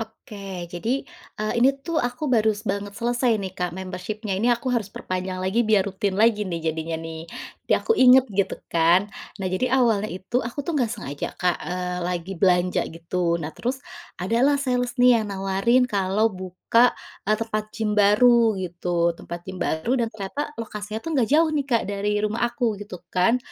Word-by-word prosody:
Oke 200 -4 -8
jadi, 230 +10 -2 0.3
eee, 215 0 -2
ini 260 +3 +6
tuh 335 -2 0
aku 245 +4 -3
baru 220 -6 +1
banget 200 +1 -3
selesai 240 0 +1
nih 195 -3 -5
Kak 180 -2 -3
membership-nya 190 +3 -5
ini 235 - +2
aku 245 +1 +1
harus 225 -5 0
perpanjang 185 -1 -4
lagi 190 +5 +1
biar 210 -3 +4
rutin 195 0 -2
lagi 210 -2 +3
nih 165 -2 -2
jadinya 160 +1 -4
nih 165 0 -7 0.4
biar - - +4
aku - - +4
inget 260 - +7
gitu 195 -1 0 0.2
kan 170 +4 +4 0.3
nah 195 - -4
jadi 185 +7 -1
awalnya 220 -4 +2
itu 190 +7 -2
aku 240 +4 -5
tuh 340 - -2
nggak 245 - +1
sengaja 205 - -5
Kak, 180 -1 +1
eee, 180 0 -3
lagi 180 +1 -3
belanja 180 0 +3
gitu. 170 +1 -1
Nah 160 -2 -5
terus, 250 - -3 0.4
ada 190 +6 -1
lah 285 +2 +4
sales 250 -3 -1
nih 245 -2 +6
yang 215 - -3
nawarin 195 +6 +2
kalau 205 -2 +1
buka, 185 +6 +2 0.3
eee, 215 - +4
tempat 215 -1 -2
gym 220 -2 -1
baru 220 +2 +5
gitu 175 -1 -1
tempat 170 +1 -8
gym 185 -1 -7
baru 160 +10 -1
dan 230 - 0
ternyata 225 +8 -5
lokasinya 215 -1 -5
tuh 330 - -3
nggak 255 -7 +2
jauh 320 +3 +4
nih 290 -3 -1
Kak 235 -4 +2
dari 205 +1 -1
rumah 215 +2 -2
aku 235 -4 -2
gitu 205 -3 -7 0.2
kan 185 +7 +3
210 Hz, 185 wpm, -24 LUFS, 185-235 Hz, 0.4 s, inget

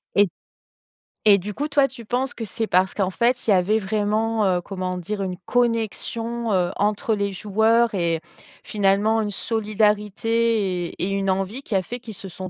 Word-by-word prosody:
Et 205 0 +5 1.0
et 205 -2 +8
du 205 +2 -5
coup, 290 +7 -2
toi 280 -2 +3
tu 240 -3 -11
penses 250 +4 -1
que 225 - -5
c'est 225 +2 -3
parce 185 0 +2
qu'en 195 -2 0
fait, 240 +5 +1
il - - +4
y - - +7
avait 190 +4 +3
vraiment, 215 +1 0
heu, 180 -2 +2
comment 185 -1 -4
dire? 200 +4 -4
Une 185 -2 -3
connexion, 230 0 -1
heu, 180 -2 +1
entre 210 +2 +1
les 200 -1 -1
joueurs 220 +4 +2
et 170 -3 0 0.4
finalement 210 +2 +2
une 210 -1 -2
solidarité 210 -2 0
et - - -6
et 195 - 0
une 195 0 -1
envie, 195 +6 -1
qui 225 - -4
a 190 - +3
fait 245 +6 -6
qu'ils 225 -2 -9
se 195 0 -7
sont 185 +1 -7
210 Hz, 185 wpm, -23 LUFS, 190-225 Hz, 1.0 s, et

